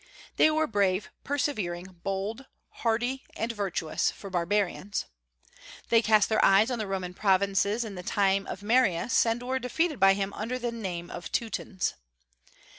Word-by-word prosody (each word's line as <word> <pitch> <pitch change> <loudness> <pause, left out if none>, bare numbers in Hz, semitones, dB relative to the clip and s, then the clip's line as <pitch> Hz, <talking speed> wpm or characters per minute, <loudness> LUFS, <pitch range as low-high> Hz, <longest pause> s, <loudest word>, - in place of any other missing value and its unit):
They - - +6
were 310 0 +2
brave, 200 -4 0
persevering, 190 - -2
bold, 200 +7 -3 0.4
hardy, 245 +3 0
and 225 +2 -2
virtuous, 195 -7 -1
for 195 - -9
barbarians. 190 +2 -1 0.8
They 230 -1 +5
cast 215 -2 +4
their 220 -1 +2
eyes 200 +5 +5
on 240 - -2
the 215 - -2
Roman 185 -2 -3
provinces 200 +3 +2
in 210 - -6
the 180 - -6
time 195 +1 +1
of 195 - -6
Marius, 230 -1 +3
and 230 +2 0
were 260 +1 -1
defeated 300 +4 -1
by 195 0 +6
him 195 0 -2
under 230 +4 -3
the 240 -1 -2
name 180 -7 -5
of 175 - -7
Teutons. 215 -4 -2
205 Hz, 155 wpm, -28 LUFS, 190-235 Hz, 0.8 s, They